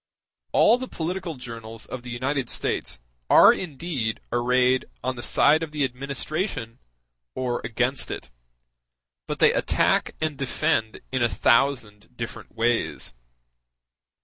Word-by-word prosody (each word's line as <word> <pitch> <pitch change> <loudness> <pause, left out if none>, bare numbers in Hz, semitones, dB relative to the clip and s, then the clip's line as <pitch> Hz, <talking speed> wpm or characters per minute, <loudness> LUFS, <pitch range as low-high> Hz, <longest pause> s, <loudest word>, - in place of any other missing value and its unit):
All 240 - +5
the 255 - -4
political 175 -1 -4
journals 115 -3 -8
of 130 - -7
the 125 - -9
United 130 +2 -2
States - - -1 0.3
are - - +8
indeed 145 -9 -3
arrayed 125 +2 +2 0.2
on 130 0 -1
the 120 - -6
side 145 +7 +4
of 165 - -3
the 150 -2 0
administration 135 - -3 0.6
or 125 -2 -1
against 125 +3 -1
it; - - -6 1.0
but - - -3
they - - +5
attack - - +1
and 155 -3 -2
defend 130 -4 0
in 130 -1 0
a 120 - +3
thousand 120 -3 +1
different 115 -1 -7
ways. 115 - 0
130 Hz, 125 wpm, -25 LUFS, 120-145 Hz, 1.0 s, are